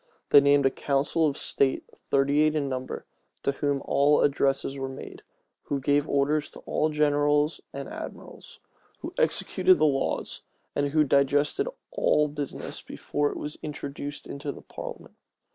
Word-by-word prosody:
They 145 - +9
named 140 0 +4
a 135 - +4
council 145 +4 +1
of 140 - -2
state, 135 -1 +1 0.3
thirty 140 +2 +3
eight 155 0 +3
in 145 -2 0
number, 130 -1 -4 0.4
to - - +2
whom 140 0 -1
all 145 +1 +4
addresses 135 -1 +1
were 135 -1 -4
made, 130 - -9 0.4
who 140 - -1
gave 145 +2 +1
orders 145 +2 +1
to - - -12
all 155 - 0
generals 150 0 +2
and - - -6
admirals, - - -9 0.4
who - - -6
executed 375 -5 +3
the - - +3
laws, 135 -3 -1 0.3
and 145 - +1
who 155 +2 +3
digested 145 - +2 0.2
all 150 - +3
business 145 -1 -5
before 145 0 -2
it - - -6
was 150 - -6
introduced 145 -1 -6
into 140 +1 -5
parliament. - - -9
145 Hz, 150 wpm, -27 LUFS, 140-150 Hz, 0.4 s, They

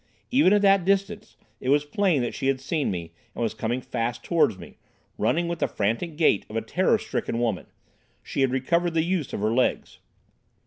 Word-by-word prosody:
Even 255 -7 +5
at 205 0 +4
that 195 -2 +5
distance 200 +3 -1 0.2
it 130 - -3
was 145 +1 +3
plain 165 -3 +1
that 120 - -3
she 135 - -3
had 135 -1 +1
seen 145 +2 -1
me, 85 -3 -5 0.2
and - - -2
was 115 - -1
coming 120 +3 -2
fast 120 0 -3
towards 165 - +2
me, 85 -4 -13 0.4
running 170 +1 +1
with 170 0 -3
the - - +1
frantic 115 - -2
gait 155 - +3
of 110 - -9
a 115 - 0
terror 185 - +2
stricken 115 - -3
woman. 115 -6 -1 0.6
She - - -3
had 135 - +3
recovered 165 +7 0
the 160 - +3
use 175 -4 -1
of - - -4
her 110 +2 +1
legs. 125 +1 0
145 Hz, 205 wpm, -25 LUFS, 115-175 Hz, 0.6 s, Even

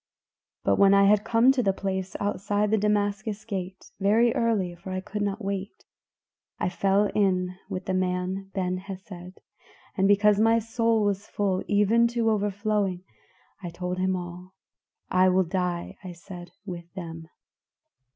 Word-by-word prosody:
"But - - +2
when 200 0 +6
I 200 - +6
had 210 +1 +4
come 235 +3 +4
to 265 -2 +1
the 195 -4 +2
place 190 -1 -3
outside 205 +1 0
the 220 - +4
Damascus 205 0 -1
Gate 190 -3 -6
very 225 +4 +3
early, 210 -7 0
for 175 +2 -11
I 185 0 -2
could 205 +3 -5
not 200 +1 -2
wait 195 0 -5 0.7
I - - -1
fell 195 +2 +1
in 185 -3 +1
with 185 -1 -4
the 190 - -1
man 185 +1 -1
Ben 185 -1 -1
Hesed, 185 -1 -10 0.6
and 195 -1 +2
because 205 0 +4
my 225 +1 +4
soul 230 0 +1
was 205 0 -1
full 195 -2 -1
even 210 +3 +4
to 225 -1 +3
overflowing, 205 -2 -1 0.6
I 175 - -5
told 180 +2 -4
him 185 0 +1
all. 180 +1 -8 0.6
'I 185 0 +5
will 185 +1 +3
die,' 180 -1 -3
I 180 -1 -7
said, 175 0 -10 0.2
'with 175 -3 -8
them. 165 -3 -7
195 Hz, 155 wpm, -26 LUFS, 185-210 Hz, 0.7 s, when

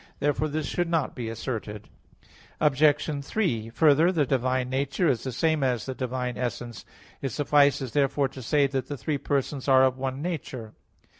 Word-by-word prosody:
Therefore 145 +2 0
this 155 0 -3
should 175 +4 -1
not 165 -5 0
be 115 -2 -5
asserted. 110 -2 -5 0.7
Obj. 150 0 +2
3: 130 - -1
Further, 155 +6 +4
the 160 -6 +1
divine 130 -1 0
nature 140 +6 0
is 130 -6 +1
the 130 - -3
same 155 +4 +1
as 125 -3 0
the 130 - -4
divine 125 -1 -3
essence. 120 -2 -4 0.4
It 135 - -1
suffices 140 -2 +2
therefore 140 +1 +1
to 135 0 -10
say 145 +4 +2
that 135 -1 -2
the 145 - -5
three 140 +5 -2
persons 140 0 -2
are 130 -1 +6
of 130 0 +2
one 130 0 -3
nature. 135 -9 -5
135 Hz, 170 wpm, -26 LUFS, 125-145 Hz, 0.7 s, are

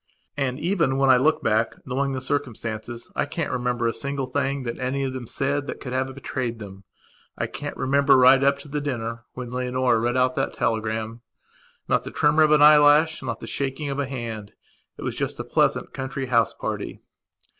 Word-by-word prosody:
And 135 -1 -2
even 165 -6 +1
when 135 -1 +5
I 130 - +7
look 155 +5 +2
back, 110 +1 +1
knowing 135 +1 -1
the 130 - -3
circumstances, 120 -4 -4
I - - +1
can't 155 +1 -3
remember 125 -1 -1
a 115 - +1
single 140 -1 -3
thing 135 -1 -2
any 130 +3 -2
of 130 -1 -2
them 130 -3 -6
said 140 +3 -1
that - - -5
could 125 -2 -6
have 130 0 -2
betrayed 125 -4 -3
them. 100 -3 -10 0.5
I - - -1
can't - - -6
remember, 140 +1 +4
right 130 +1 +6
up 140 0 +3
to 150 - -12
the 145 +1 -3
dinner, 115 -4 -4
when 125 -1 -7
Leonora 125 -1 +1
read 120 +2 0
out 130 0 +3
that - - -1
telegramnot 110 0 -2 0.8
the - - -6
tremor 150 +1 +3
of 155 - +5
an 150 -1 +6
eyelash, 150 +1 +6
not - - -4
the - - -6
shaking 140 +1 -2
of 140 - -3
a 140 - -1
hand. 115 -5 -6 0.4
It - - -8
was - - -3
just - - -3
a - - -2
pleasant - - +1
country 130 0 -4
house 115 -3 +2
party. - - -4
130 Hz, 195 wpm, -24 LUFS, 120-140 Hz, 0.8 s, I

